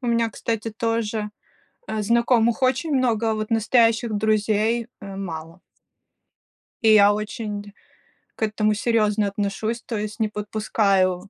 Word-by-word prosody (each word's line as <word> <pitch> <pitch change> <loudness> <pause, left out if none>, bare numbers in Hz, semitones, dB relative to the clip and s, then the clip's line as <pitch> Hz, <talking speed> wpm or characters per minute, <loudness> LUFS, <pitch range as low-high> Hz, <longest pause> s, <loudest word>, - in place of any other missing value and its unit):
У 250 - -5
меня, 230 -1 +1
кстати, 225 +1 -3
тоже, 220 -1 -2 0.6
э, 220 - -2
знакомых 235 +2 +2
очень 280 +4 +1
много, 230 -4 +1
а 220 - 0
вот 215 +1 -4
настоящих 225 0 +2
друзей, 215 +2 +1
э, 195 -1 -8
мало. 165 -2 -7 1.2
И 220 -1 +6
я 205 -1 +7
очень 210 -1 -5 0.6
к - - -19
этому 215 0 +1
серьезно 210 -1 +1
отношусь, 205 +3 -3
то 225 - -3
есть 210 +1 -5
не 220 - +2
подпускаю 205 -3 0
215 Hz, 135 wpm, -23 LUFS, 205-230 Hz, 1.2 s, я